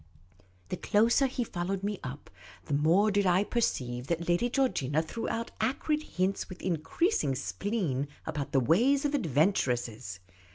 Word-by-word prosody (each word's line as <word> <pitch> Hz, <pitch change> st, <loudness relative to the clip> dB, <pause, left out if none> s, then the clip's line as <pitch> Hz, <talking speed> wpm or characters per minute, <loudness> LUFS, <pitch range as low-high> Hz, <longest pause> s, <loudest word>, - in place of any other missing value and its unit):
The -, -, -3 dB
closer 235 Hz, +6 st, +3 dB
he 250 Hz, -1 st, -2 dB
followed 190 Hz, -1 st, -3 dB
me 205 Hz, -1 st, -2 dB
up, 135 Hz, +3 st, -7 dB, 0.3 s
the -, -, -4 dB
more 170 Hz, +9 st, +4 dB
did 200 Hz, -1 st, +2 dB
I 180 Hz, +2 st, +4 dB
perceive 125 Hz, -, -1 dB
that 170 Hz, +1 st, -2 dB
Lady 175 Hz, +8 st, +2 dB
Georgina 160 Hz, -, +1 dB
threw 225 Hz, +8 st, -4 dB
out 230 Hz, 0 st, -3 dB
acrid 280 Hz, +6 st, 0 dB
hints 190 Hz, -8 st, -2 dB
with 185 Hz, -, -9 dB
increasing 165 Hz, -, 0 dB
spleen 150 Hz, -, -2 dB, 0.2 s
about 150 Hz, -3 st, -4 dB
the 135 Hz, -, +4 dB
ways 240 Hz, -, +3 dB
of 290 Hz, -, 0 dB
adventuresses. 125 Hz, -, 0 dB
185 Hz, 150 wpm, -30 LUFS, 145-230 Hz, 0.3 s, more